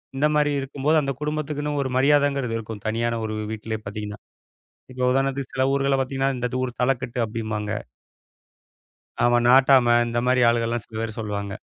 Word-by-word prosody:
இந்தமாரி 150 Hz, +1 st, +2 dB
இருக்கும்போது 140 Hz, +3 st, +1 dB
அந்தக் 135 Hz, -2 st, -4 dB
குடும்பத்துக்குன்னு 150 Hz, -1 st, -2 dB
ஒரு 130 Hz, -, -3 dB
மரியாதைங்கிறது 140 Hz, -3 st, +2 dB
இருக்கும். 110 Hz, -2 st, -7 dB
தனியான 115 Hz, +1 st, -1 dB
ஒரு 110 Hz, 0 st, -3 dB, 0.2 s
வீட்லே 110 Hz, 0 st, -4 dB
பாத்தீங்கன்னா. 105 Hz, 0 st, -6 dB, 0.7 s
இப்ப 125 Hz, 0 st, -7 dB
உதாரணத்துக்கு 135 Hz, 0 st, -1 dB
சில 130 Hz, 0 st, +1 dB
ஊர்கள 140 Hz, 0 st, +2 dB
பாத்தீங்கன்னா, 135 Hz, +1 st, -1 dB
"இந்த 125 Hz, -, -1 dB, 0.2 s
ஊர் 125 Hz, -1 st, -5 dB
தலக்கட்டு" 125 Hz, -1 st, 0 dB
அப்பிடிம்பாங்க 110 Hz, -2 st, -4 dB, 1.5 s
அவன் 120 Hz, 0 st, +3 dB
நாட்டாம, 130 Hz, -2 st, +6 dB
இந்த 120 Hz, 0 st, -2 dB
மாரி 125 Hz, -1 st, +3 dB
ஆளுக 115 Hz, 0 st, 0 dB
எல்லாம் 120 Hz, -2 st, -2 dB
சில 110 Hz, -, -8 dB
பேர் 115 Hz, 0 st, -4 dB
சொல்லுவாங்க. 100 Hz, -2 st, -4 dB
125 Hz, 150 wpm, -23 LUFS, 115-135 Hz, 1.5 s, நாட்டாம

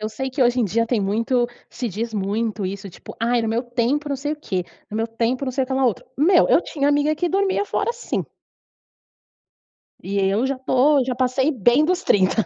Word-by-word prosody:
Eu 215 Hz, -, -2 dB
sei 265 Hz, +4 st, -4 dB
que 260 Hz, 0 st, 0 dB
hoje 245 Hz, +1 st, +3 dB
em -, -, +3 dB
dia 230 Hz, +4 st, 0 dB
tem 235 Hz, -2 st, 0 dB
muito, 230 Hz, +5 st, +1 dB, 0.2 s
se 245 Hz, -, -4 dB
diz 225 Hz, +3 st, -4 dB
muito 210 Hz, +1 st, -2 dB
isso, 195 Hz, +1 st, -6 dB
tipo: -, -, -12 dB
"Ai, 235 Hz, 0 st, +2 dB
no 225 Hz, -, -1 dB
meu 230 Hz, +3 st, 0 dB
tempo 245 Hz, +5 st, -1 dB
não 280 Hz, -, -1 dB
sei 290 Hz, +3 st, -3 dB
o 305 Hz, -, -5 dB
quê, 185 Hz, -8 st, -2 dB, 0.3 s
no 215 Hz, -, -4 dB
meu 225 Hz, +1 st, 0 dB
tempo 230 Hz, +4 st, -1 dB
não 260 Hz, -, -3 dB
sei 265 Hz, +1 st, 0 dB
o -, -, -14 dB
quê 265 Hz, -, -5 dB
lá 265 Hz, 0 st, +1 dB
outro." 235 Hz, -6 st, 0 dB
Meu, 340 Hz, +5 st, +4 dB
eu -, -, +5 dB
tinha 285 Hz, -3 st, -1 dB
amiga 290 Hz, +1 st, +2 dB
que 350 Hz, +3 st, 0 dB
dormia 390 Hz, +1 st, +1 dB
fora, 420 Hz, +3 st, -1 dB
sim. 475 Hz, -, -3 dB, 1.8 s
E 200 Hz, +1 st, -3 dB
eu 200 Hz, +6 st, +1 dB
já 275 Hz, -, -2 dB
tô 265 Hz, +2 st, +3 dB
já 255 Hz, -, -2 dB
passei 260 Hz, +3 st, +1 dB
bem 245 Hz, +2 st, +3 dB
dos 365 Hz, +3 st, 0 dB
30. 200 Hz, +2 st, +2 dB
250 Hz, 225 wpm, -22 LUFS, 225-285 Hz, 1.8 s, eu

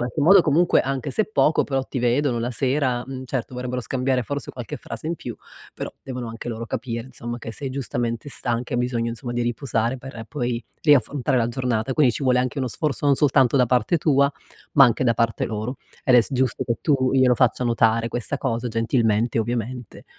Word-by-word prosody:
qualche 120 Hz, +5 st, -2 dB
modo 180 Hz, +5 st, +7 dB
comunque, 170 Hz, +3 st, +3 dB
anche 135 Hz, +1 st, -3 dB
se 215 Hz, -, +1 dB
poco 155 Hz, -7 st, +3 dB
però, 135 Hz, -1 st, -1 dB
ti 130 Hz, -, -5 dB
vedono 125 Hz, +1 st, +1 dB
la 120 Hz, +1 st, -2 dB
sera, 130 Hz, 0 st, 0 dB
mhmm, 130 Hz, -1 st, -6 dB
certo, 130 Hz, -1 st, -4 dB
vorrebbero 125 Hz, 0 st, -3 dB
scambiare 130 Hz, +1 st, 0 dB
forse 145 Hz, +4 st, -4 dB
qualche 120 Hz, -4 st, -7 dB
frase 115 Hz, +6 st, -8 dB
in 165 Hz, -, -1 dB
più, 120 Hz, -7 st, -7 dB, 0.4 s
però, -, -, -6 dB
devono 125 Hz, -3 st, -5 dB
anche 115 Hz, +1 st, -7 dB
loro 115 Hz, 0 st, -5 dB
capire 115 Hz, -1 st, -4 dB
insomma 120 Hz, -2 st, -6 dB
che 115 Hz, -, -7 dB
sei 135 Hz, +4 st, -5 dB
giustamente 120 Hz, -2 st, -3 dB
stanca, 120 Hz, -3 st, -3 dB
e -, -, 0 dB
hai 120 Hz, -, +1 dB
bisogno 120 Hz, -2 st, -1 dB
insomma 120 Hz, +1 st, -5 dB
di 120 Hz, -, -1 dB
riposare 120 Hz, 0 st, -1 dB
per 130 Hz, -3 st, -9 dB
poi 120 Hz, -1 st, -2 dB, 0.2 s
riaffrontare 140 Hz, -2 st, +3 dB
la 115 Hz, -1 st, +1 dB
giornata. 125 Hz, 0 st, -1 dB
Quindi 135 Hz, -6 st, +4 dB
ci -, -, -5 dB
vuole 125 Hz, -2 st, +3 dB
anche 130 Hz, +3 st, -2 dB
uno 130 Hz, -2 st, -1 dB
sforzo 145 Hz, +3 st, -1 dB
non 140 Hz, -, +5 dB
soltanto 135 Hz, -2 st, +3 dB
da 130 Hz, -, +5 dB
parte 125 Hz, +6 st, +2 dB
tua, 140 Hz, -3 st, +3 dB, 0.4 s
ma 140 Hz, -, +8 dB
anche 120 Hz, 0 st, +2 dB
da 115 Hz, -2 st, +3 dB
parte 115 Hz, 0 st, 0 dB
loro, 110 Hz, +4 st, -4 dB, 0.3 s
ed 125 Hz, -, +5 dB
è -, -, +8 dB
s 110 Hz, -, 0 dB
giusto 130 Hz, -3 st, 0 dB
che 115 Hz, -, 0 dB
tu 135 Hz, -4 st, +2 dB
glielo 130 Hz, -2 st, +5 dB
faccia 125 Hz, +1 st, +2 dB
notare 115 Hz, -1 st, +2 dB
questa 120 Hz, +4 st, -2 dB
cosa, 125 Hz, -3 st, -2 dB
gentilmente 115 Hz, 0 st, +1 dB
ovviamente. 120 Hz, +1 st, -4 dB
125 Hz, 210 wpm, -23 LUFS, 115-135 Hz, 0.4 s, ma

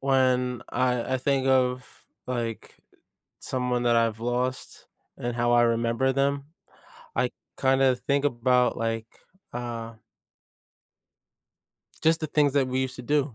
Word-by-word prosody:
When 130 Hz, -2 st, +2 dB
I 125 Hz, 0 st, 0 dB
I -, -, +3 dB
think 135 Hz, 0 st, +1 dB
of, 125 Hz, -1 st, 0 dB, 0.2 s
like, 120 Hz, -3 st, -4 dB, 0.6 s
someone 125 Hz, -1 st, -1 dB
that 120 Hz, -1 st, +4 dB
I've 115 Hz, -1 st, +1 dB
lost 125 Hz, +2 st, -3 dB, 0.3 s
and 120 Hz, 0 st, -3 dB
how 120 Hz, 0 st, +2 dB
I 120 Hz, 0 st, +5 dB
remember 115 Hz, +3 st, +1 dB
them, 140 Hz, +1 st, 0 dB, 0.7 s
I -, -, +1 dB, 0.3 s
kind 135 Hz, 0 st, +2 dB
of 130 Hz, -2 st, +3 dB
think 140 Hz, 0 st, 0 dB
about, 125 Hz, -1 st, +2 dB
like, 115 Hz, -1 st, -2 dB, 0.5 s
uh 115 Hz, -2 st, -5 dB, 2.1 s
just 160 Hz, +1 st, +3 dB
the 155 Hz, -, -1 dB
things 145 Hz, -1 st, +2 dB
that 135 Hz, -2 st, +2 dB
we 130 Hz, +1 st, 0 dB
used 130 Hz, -1 st, -3 dB
to 125 Hz, -, -7 dB
do, 145 Hz, 0 st, 0 dB
125 Hz, 135 wpm, -26 LUFS, 120-135 Hz, 2.1 s, I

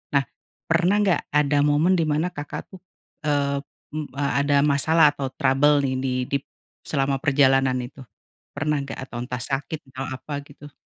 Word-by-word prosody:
nah 140 Hz, -, +4 dB, 0.4 s
pernah 180 Hz, +5 st, +3 dB
enggak 190 Hz, -6 st, +2 dB
ada 145 Hz, 0 st, +3 dB
momen 150 Hz, +5 st, +3 dB
di -, -, +3 dB
mana 155 Hz, +3 st, +1 dB
Kakak 145 Hz, -3 st, -7 dB
tuh, 185 Hz, -, -12 dB, 0.5 s
eee, 140 Hz, -1 st, +1 dB, 0.3 s
m 155 Hz, -1 st, -3 dB
ada 140 Hz, 0 st, +2 dB
masalah 150 Hz, +2 st, +4 dB
atau 140 Hz, -2 st, -3 dB
trouble 145 Hz, +1 st, +3 dB
nih 130 Hz, -1 st, 0 dB
di 130 Hz, -1 st, -1 dB, 0.2 s
dip 140 Hz, -1 st, 0 dB, 0.4 s
selama 135 Hz, -2 st, 0 dB
perjalanan 135 Hz, -2 st, +3 dB
itu? 125 Hz, +3 st, -10 dB, 0.6 s
Pernah 150 Hz, 0 st, 0 dB
enggak? 140 Hz, -, -7 dB
Atau 120 Hz, -2 st, -8 dB
entah 125 Hz, -1 st, -5 dB
sakit 140 Hz, +3 st, -3 dB
atau 130 Hz, +1 st, -5 dB
apa, 145 Hz, +2 st, -6 dB
gitu? 145 Hz, 0 st, -14 dB
145 Hz, 160 wpm, -24 LUFS, 135-150 Hz, 0.6 s, nah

